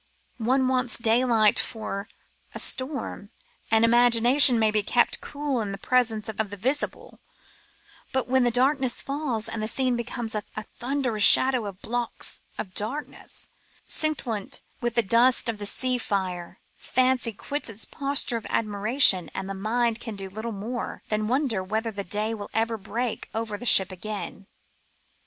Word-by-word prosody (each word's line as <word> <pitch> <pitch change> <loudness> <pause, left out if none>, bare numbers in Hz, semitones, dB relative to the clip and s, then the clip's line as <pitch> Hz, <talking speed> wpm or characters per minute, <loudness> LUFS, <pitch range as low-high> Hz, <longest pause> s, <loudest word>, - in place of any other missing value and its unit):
One 255 +3 +1
wants 255 -2 +1
daylight 230 -2 +2
for 210 -2 -5 0.5
a - - -4
storm; 260 -6 -2 0.4
the 225 0 +3
imagination 240 +2 +6
may 220 -1 +2
be 210 0 +2
kept 240 +4 +1
cool 285 -4 -3
in 205 -2 -4
the 195 - -6
presence 225 -1 0
of 220 - -5
the 205 -2 -3
visible, 260 +9 -3 0.9
but 265 -1 -1
when 260 0 +2
the 240 - +3
darkness 260 +1 +1
falls 275 -6 -3
and 225 - -4
the 215 - -2
scene 255 +2 +1
becomes 235 -1 -3
a 210 - -1 0.2
thunderous 245 0 -2
shadow 255 -1 +7
of 195 -1 -10
blocks 240 +1 -2 0.2
of 185 -3 -6
blackness, 250 +11 -4 0.3
scintillant 245 -10 -1 0.2
with 240 -1 -2
the 235 - +3
dust 235 +6 +4
of 225 -2 -1
the 205 - -2
sea 255 +3 0
fire, 185 -5 -4 0.2
fancy 255 -2 +1
quits 285 +6 -5
its 225 0 -6
posture 275 -4 0
of 225 - -8
admiration 210 - +3
and 190 - -4
the 195 - -5
mind 225 +3 -1
can 225 -3 -7
do 195 -1 -6
little 220 +4 -6
more 225 +4 -6
than 215 0 -1
wonder 245 -5 0
whether 220 +4 -3
day 210 +2 -2
will 205 -2 -7
ever 225 +1 0
break 225 +3 -4
over 220 -1 -3
the 245 +4 -5
ship 190 -3 +7
again. 200 +1 -7
230 Hz, 155 wpm, -25 LUFS, 210-255 Hz, 0.9 s, shadow